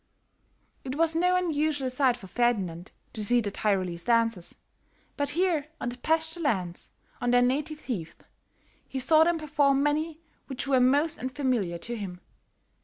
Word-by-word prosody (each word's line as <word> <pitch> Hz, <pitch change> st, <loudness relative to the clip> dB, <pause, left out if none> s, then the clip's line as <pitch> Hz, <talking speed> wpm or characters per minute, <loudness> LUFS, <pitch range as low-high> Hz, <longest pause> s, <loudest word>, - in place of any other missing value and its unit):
It 260 Hz, 0 st, -4 dB
was 325 Hz, +1 st, +2 dB
no 360 Hz, +2 st, +3 dB
unusual 305 Hz, -6 st, 0 dB
sight 255 Hz, -1 st, +2 dB
for 200 Hz, -, -12 dB
Ferdinand 190 Hz, -6 st, -1 dB, 0.2 s
to 215 Hz, -, -4 dB
see 240 Hz, +4 st, +4 dB
the 210 Hz, -3 st, -2 dB
Tyrolese 185 Hz, -5 st, -1 dB
dances; 230 Hz, -6 st, +1 dB, 0.6 s
but 285 Hz, -1 st, -1 dB
here 345 Hz, -5 st, +1 dB
on 245 Hz, -, -2 dB
the 245 Hz, -, -7 dB
pasture 320 Hz, +3 st, 0 dB
lands, 190 Hz, -, -2 dB, 0.3 s
on 245 Hz, -, 0 dB
their 245 Hz, 0 st, +5 dB
native 300 Hz, +5 st, -1 dB
heath, 180 Hz, -11 st, -6 dB, 0.7 s
he 265 Hz, -, -3 dB
saw 310 Hz, +5 st, +5 dB
them 340 Hz, 0 st, +2 dB
perform 280 Hz, -3 st, +2 dB
many 310 Hz, +2 st, 0 dB, 0.3 s
which 270 Hz, 0 st, -4 dB
were 270 Hz, -2 st, +3 dB
most 285 Hz, +5 st, +3 dB
unfamiliar 250 Hz, -8 st, -1 dB
to 235 Hz, +8 st, -6 dB
him. 190 Hz, -5 st, -6 dB
260 Hz, 155 wpm, -27 LUFS, 225-305 Hz, 0.7 s, their